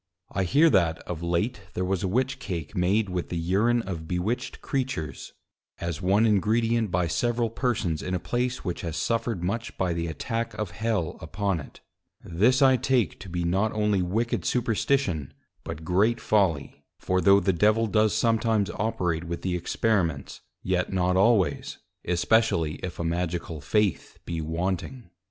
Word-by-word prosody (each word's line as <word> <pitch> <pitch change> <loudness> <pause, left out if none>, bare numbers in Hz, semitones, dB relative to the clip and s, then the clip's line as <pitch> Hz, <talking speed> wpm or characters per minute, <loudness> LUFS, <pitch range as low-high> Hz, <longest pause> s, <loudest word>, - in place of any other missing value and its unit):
I 95 0 0
hear 145 - +5
that 85 -6 +3
of 85 -2 -6
late 100 +7 -1
there 90 - -1
was 95 0 -1
a 95 - 0
Witch 130 +6 0
cake 85 - -5
made 100 +4 +2
with 90 -2 -3
the 85 - -3
Urine 105 +8 +2
of 85 -4 -6
bewitched 105 +9 -2
Creatures, 125 - -3 0.5
as 85 0 -4
one 100 +4 +3
Ingredient 110 +2 +2
by 90 0 +1
several 120 +6 0
Persons 115 - -1
in 95 - -2
a - - -1
place, 125 +5 -2
which 90 - -3
has 85 -3 -4
suffered 115 -5 -1
much 115 +6 -3
by 90 -2 0
the 85 0 -2
Attack 115 +8 -3
of 105 -5 -3
Hell 105 -3 -2
upon 95 +3 -1
it: 70 - -12 0.4
This 120 - +3
I 130 -1 +6
take 130 -2 +1
to 95 - -9
be 90 0 -2
not 95 +6 +1
only 105 -2 +1
wicked 110 +7 -1
Superstition, 115 - 0 0.3
but 80 +2 -7
great 105 +7 +2
Folly: 90 -12 0
For 95 0 0
tho' 100 +3 +6
the 95 0 +1
Devil 105 +5 +3
does 110 0 +2
sometimes 110 -2 +2
operate 90 -6 -1
with 85 0 -5
the 90 -1 0
Experiments, 90 -4 -1 0.2
yet 90 -1 0
not 90 -1 +1
always, 100 -1 +2 0.3
especially 85 -3 +2
if 90 -1 -6
a - - -1
Magical 85 -2 -2
Faith 105 +4 0
be 85 -1 -3
wanting. 90 +7 -3
95 Hz, 165 wpm, -26 LUFS, 85-115 Hz, 0.5 s, I